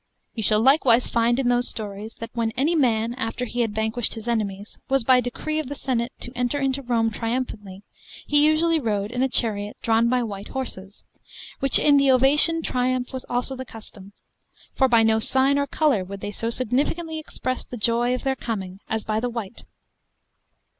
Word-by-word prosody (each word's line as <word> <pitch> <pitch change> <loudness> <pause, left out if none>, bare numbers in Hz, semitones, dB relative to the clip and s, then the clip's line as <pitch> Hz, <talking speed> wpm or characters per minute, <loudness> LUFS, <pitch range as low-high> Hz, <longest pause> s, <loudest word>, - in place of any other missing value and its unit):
You 225 - -4
shall 215 0 +2
likewise 255 -2 +4
find 235 +1 +1
in 265 -2 0
those 245 0 +3
stories, 210 0 -5
that 230 0 -8
when 230 -1 -1
any 295 +6 +2
man, 235 -5 +1
after 245 0 -4
he 245 +1 -3
had 220 -3 -2
vanquished 220 +1 -1
his 225 +1 -8
enemies, 210 -3 -3
was 270 -2 +2
by 255 +1 +4
decree 310 +6 -3
of 310 - -4
the 285 - -5
senate 250 -3 -2
to 245 - -5
enter 250 +3 -1
into 270 0 -1
Rome 230 -3 0
triumphantly, 220 -4 -4 0.4
he 290 0 +3
usually 320 +2 +3
rode 210 -5 -2
in 250 +1 -2
a 265 - +2
chariot 210 -4 +1
drawn 230 +1 +2
by 250 0 +1
white 200 -3 -6
horses: 205 -7 -7 0.5
which 275 -1 +5
in 290 -1 +4
the 275 -1 +3
ovation 290 +6 +5
triumph 250 0 -1
was 260 0 -5
also 245 +2 -1
the 260 - -6
custom; 210 -4 -12 0.6
for 265 - +3
by 230 -3 +4
no 220 0 +3
sign 270 +4 +2
or 280 - -1
colour 285 -12 +1
would 195 +1 -9
they 205 - -4
so 230 +2 -3
significantly 290 +7 -1
express 255 -4 -4
the 245 - -9
joy 235 +3 +1
of 255 - -7
their 270 -1 0
coming 195 -7 -5
as 220 -1 -2
by 215 0 -1
the 245 +2 -2
white. 230 -3 -7
240 Hz, 195 wpm, -23 LUFS, 220-265 Hz, 0.6 s, which